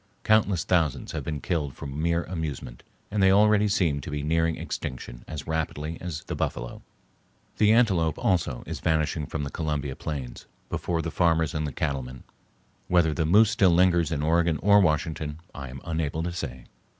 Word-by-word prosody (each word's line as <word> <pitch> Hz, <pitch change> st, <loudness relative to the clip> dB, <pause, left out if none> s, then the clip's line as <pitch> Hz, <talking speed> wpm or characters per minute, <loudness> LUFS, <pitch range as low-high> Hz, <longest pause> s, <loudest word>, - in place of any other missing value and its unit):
Countless 105 Hz, -5 st, +3 dB
thousands 80 Hz, -6 st, 0 dB
have -, -, -4 dB
been 75 Hz, -2 st, -3 dB
killed 75 Hz, -7 st, -2 dB
for -, -, -8 dB
mere 85 Hz, +5 st, -1 dB
amusement 80 Hz, -8 st, -5 dB, 0.3 s
and 105 Hz, -1 st, 0 dB
they 95 Hz, -, +6 dB
already 105 Hz, +1 st, +5 dB
seem 85 Hz, -8 st, +1 dB
to -, -, -7 dB
be 75 Hz, -1 st, -3 dB
nearing 80 Hz, +1 st, +1 dB
extinction -, -, -6 dB
as 75 Hz, -2 st, -6 dB
rapidly 80 Hz, 0 st, -3 dB
as 85 Hz, -4 st, -5 dB
the -, -, -5 dB
buffalo. -, -, -3 dB, 0.8 s
The 105 Hz, 0 st, +5 dB
antelope 95 Hz, -9 st, +3 dB
also 90 Hz, -, 0 dB
is -, -, -5 dB
vanishing 80 Hz, -2 st, 0 dB
from 80 Hz, -, -3 dB
the 70 Hz, -, -5 dB
Columbia 75 Hz, -4 st, -2 dB
plains 70 Hz, -6 st, -6 dB, 0.2 s
before 85 Hz, -2 st, -2 dB
the 85 Hz, -, -3 dB
farmers 80 Hz, -3 st, +2 dB
and 75 Hz, -4 st, -3 dB
cattlemen. 65 Hz, -4 st, -3 dB, 0.6 s
Whether 85 Hz, -3 st, +3 dB
the 80 Hz, 0 st, 0 dB
moose 105 Hz, +5 st, +5 dB
still 100 Hz, -4 st, +4 dB
lingers 85 Hz, -2 st, +3 dB
in 75 Hz, -2 st, -1 dB
Oregon 85 Hz, 0 st, +2 dB
or 100 Hz, +1 st, +6 dB
Washington 80 Hz, -3 st, 0 dB
I 70 Hz, -2 st, -7 dB
am 65 Hz, +1 st, -9 dB
unable 80 Hz, -1 st, -2 dB
to 85 Hz, 0 st, -3 dB
say. 65 Hz, -8 st, -6 dB
80 Hz, 175 wpm, -26 LUFS, 75-90 Hz, 0.8 s, they